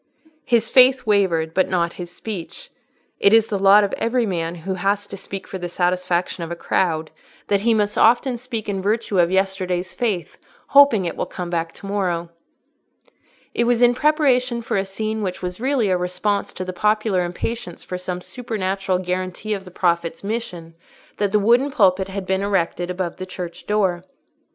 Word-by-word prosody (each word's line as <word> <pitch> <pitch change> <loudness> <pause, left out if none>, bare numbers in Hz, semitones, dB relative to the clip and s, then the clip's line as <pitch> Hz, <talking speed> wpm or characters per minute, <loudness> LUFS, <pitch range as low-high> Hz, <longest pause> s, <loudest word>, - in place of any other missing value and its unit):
His 230 -2 +2
faith 255 +1 +5
wavered, 180 -7 +2
but 185 - +2
not 170 -2 0
his 175 -1 -7
speech: 215 - -8 0.5
it 200 - +5
is 225 -1 +6
the 200 - -1
lot 200 +2 +7
of 200 - -2
every 235 +1 +1
man 170 -4 -2
who 180 +3 -4
has 200 +2 0
to 200 - -8
speak 195 0 -7
for 190 - -7
the 175 0 -4
satisfaction 180 0 -1
of 165 - -5
the 170 - -4
crowd, 160 -2 -1 0.4
that 200 - +3
he 225 +2 +2
must 210 -1 0
often 240 +2 +3
speak 235 -3 -5
in 195 -2 -2
virtue 210 -1 0
of 170 -1 +4
yesterday's 185 -1 -1
faith, 210 -8 -2 0.3
hoping 280 -9 +6
it 170 - -3
will - - -3
come 175 -1 -6
back 165 -1 -1
to - - -12
morrow. 180 -4 -2 1.2
It 235 - +1
was 240 0 +3
in 245 0 +6
preparation 255 -4 +2
for - - -2
a 195 0 +1
scene 215 +3 -3
which 185 -3 -4
was 180 +3 -5
really 260 -5 +1
a 185 - +2
response 180 +3 -1
to 185 - -5
the 185 - -5
popular 210 -1 +1
impatience 180 +2 -5
for 180 - -5
some 180 0 -4
supernatural 195 -2 -2
guarantee 185 +3 -3
of 195 -2 -5
the - - -10
Prophet's 170 -2 -1
mission, 190 -6 -5 0.4
that 205 -2 0
the 210 - +4
wooden 240 +7 +3
pulpit 195 -8 +3
had 195 0 -5
been 190 0 0
erected 180 -3 -1
above 180 -1 -3
the 185 - -6
church 180 -2 -7
door. 195 -4 +1
195 Hz, 185 wpm, -21 LUFS, 180-220 Hz, 1.2 s, lot